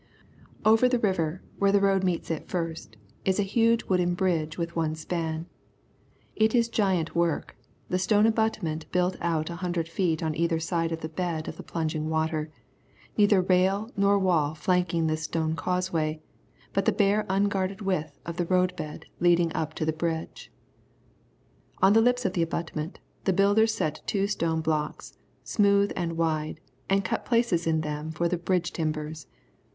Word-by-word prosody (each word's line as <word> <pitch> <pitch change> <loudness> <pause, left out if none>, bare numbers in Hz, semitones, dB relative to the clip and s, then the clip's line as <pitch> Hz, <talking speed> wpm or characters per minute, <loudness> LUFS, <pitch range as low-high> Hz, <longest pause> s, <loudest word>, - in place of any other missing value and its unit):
Over 225 +3 +5
the 250 - +2
river, 185 -6 -1 0.2
where 200 0 +4
the 200 - +4
road 195 -1 +2
meets 180 -2 -1
it 160 - -4
first, 165 - -4 0.3
is 190 +1 +1
a - - +3
huge 230 +3 +2
wooden 180 -2 +1
bridge 165 -4 0
with 170 -1 -3
one 160 -2 0
span. 160 0 -3 0.9
It 220 +2 +3
is 235 -1 +3
giant 190 -7 0
work, 170 -2 0 0.3
the 185 - 0
stone 210 +3 +3
abutment 220 -8 0
built 180 0 +1
out 165 -1 -1
a 170 - -6
hundred 175 -2 -2
feet 165 -1 0
on 160 -1 0
either 165 +1 0
side 165 0 -1
into 165 -1 -4
the 160 0 -5
bed 165 -2 -2
of - - -6
the - - -7
plunging 155 -1 -3
water, 160 -1 -1 0.7
neither 205 -3 +4
rail 190 +4 +2
nor 200 0 +3
wall 165 -6 +2
flanking 170 0 +1
this 155 0 0
stone 160 0 -1
causeway, 165 -3 -1 0.5
but - - +1
the - - +4
bare 205 0 +2
unguarded 195 0 0
width 160 -7 -2
of 170 0 -5
the 175 - -1
road 185 0 +2
bed 155 -3 -7
leading 175 -1 +3
up 155 0 -2
into 155 - -2
the 160 - +1
bridge. 160 0 -4 1.3
On 195 +1 +5
the 225 - +6
lips 245 +1 +2
of - - +1
the 175 - 0
abutment, 165 0 -3 0.3
the 190 - +3
builders 205 +4 +4
set 155 -8 -2
two 200 -1 +1
stone 165 -5 0
blocks, 155 -1 -2 0.3
smooth 200 -1 +3
and 165 -2 -2
wide, 155 -2 -1 0.3
and 195 0 +2
cut - - -1
places 230 -9 +1
in 160 -1 +2
them 150 0 -4
for 170 +2 0
the 180 +1 0
bridge 175 0 -1
timbers. 155 -2 -3
170 Hz, 170 wpm, -27 LUFS, 160-195 Hz, 1.3 s, the